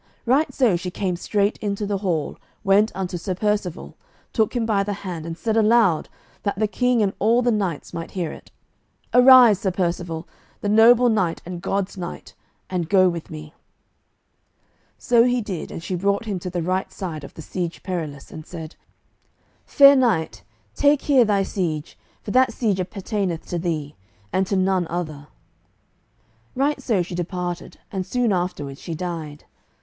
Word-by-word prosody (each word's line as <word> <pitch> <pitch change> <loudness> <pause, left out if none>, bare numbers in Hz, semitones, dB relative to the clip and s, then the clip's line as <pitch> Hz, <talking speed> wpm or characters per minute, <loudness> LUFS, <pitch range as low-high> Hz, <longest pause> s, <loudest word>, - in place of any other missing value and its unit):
Right 270 +6 +2
so 245 -9 +2
she 180 +1 -3
came 180 0 -2
straight 200 +3 0
into 205 0 -2
the 200 -1 -2
hall, 170 -7 -2 0.2
went 205 +2 +4
unto 180 -2 -3
Sir 185 +2 -3
Percivale, 205 -3 -2 0.4
took 220 +1 +1
him 235 -2 0
by 210 -3 +2
the 205 +1 -2
hand, 170 -3 -5
and 165 0 -5
said 220 +2 -1
aloud, 220 -6 +3 0.3
that 200 -2 -2
the 215 +1 +1
King 250 +1 +1
and 195 -1 0
all 230 +4 +3
the 245 - +3
knights 195 -8 -2
might 165 - -5
hear 170 -4 -1
it, - - -12 0.6
"Arise, 250 -5 +8
Sir 195 - 0
Percivale, 175 -2 -2 0.3
the 205 - -1
noble 230 +3 +6
knight 190 -8 0
and 175 0 -6
God's 195 0 -2
knight, 175 -1 -7 0.3
and 175 -3 -3
go 185 -2 +5
with 170 -2 -6
me." 155 0 -9 1.4
So 240 -2 +4
he 250 0 +2
did, 200 -7 -5
and 165 - -7
she 185 - -4
brought 200 +4 0
him 200 -4 -3
to 180 - -5
the 175 -1 -3
right 185 +2 -1
side 160 -6 -6
of - - -11
the 160 - -9
Siege 175 0 -4
Perilous, 155 -7 -5
and 155 - -8
said, 160 -1 -9 0.9
"Fair 280 -1 +7
knight, 235 -12 +1 0.3
take 285 0 +3
here 265 -5 +4
thy 200 -2 +2
siege, 165 -6 -3 0.3
for 205 - -5
that 255 +1 +4
siege 215 -5 -1
appertaineth 185 -1 -3
to 175 - -2
thee, 155 -4 -3 0.4
and 190 0 +1
to 200 - -1
none 185 -2 +1
other." 155 -4 -5 1.3
Right 285 +3 0
so 205 -7 +1
she 175 - -8
departed, 175 0 -4
and 190 -2 -2
soon 240 +1 0
afterward 145 -7 -3
she 165 - -6
died. 160 -4 -5
190 Hz, 170 wpm, -22 LUFS, 170-215 Hz, 1.4 s, Arise